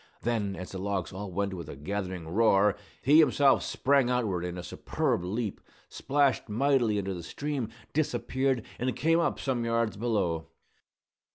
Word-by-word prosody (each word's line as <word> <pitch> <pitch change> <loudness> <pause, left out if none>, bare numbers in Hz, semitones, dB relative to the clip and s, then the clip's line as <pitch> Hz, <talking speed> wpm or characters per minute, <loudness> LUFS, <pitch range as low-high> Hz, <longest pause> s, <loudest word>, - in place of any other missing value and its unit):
Then, 110 -4 0
as 90 - -7
the 95 - -5
logs 95 -2 -2
all 100 0 -6
went 100 +2 -1
with 85 -5 -7
a - - -7
gathering 90 +2 -4
roar, 100 +1 +4 0.3
he 145 +4 +6
himself 145 -3 +5
sprang 135 -2 +2
outward 110 -8 0
in 90 0 -4
a 90 - -5
superb 90 0 -1
leap, 105 +3 -3 0.3
splashed 140 -4 +1
mightily 120 -1 +2
into 100 -1 -2
the 90 - -6
stream, 140 - -3 0.2
disappeared, 130 -3 0
and 125 +1 -1
came 165 +2 +3
up 170 - 0
some 125 -3 -1
yards 115 -2 0
below. 100 -8 -1
110 Hz, 160 wpm, -29 LUFS, 95-130 Hz, 0.3 s, he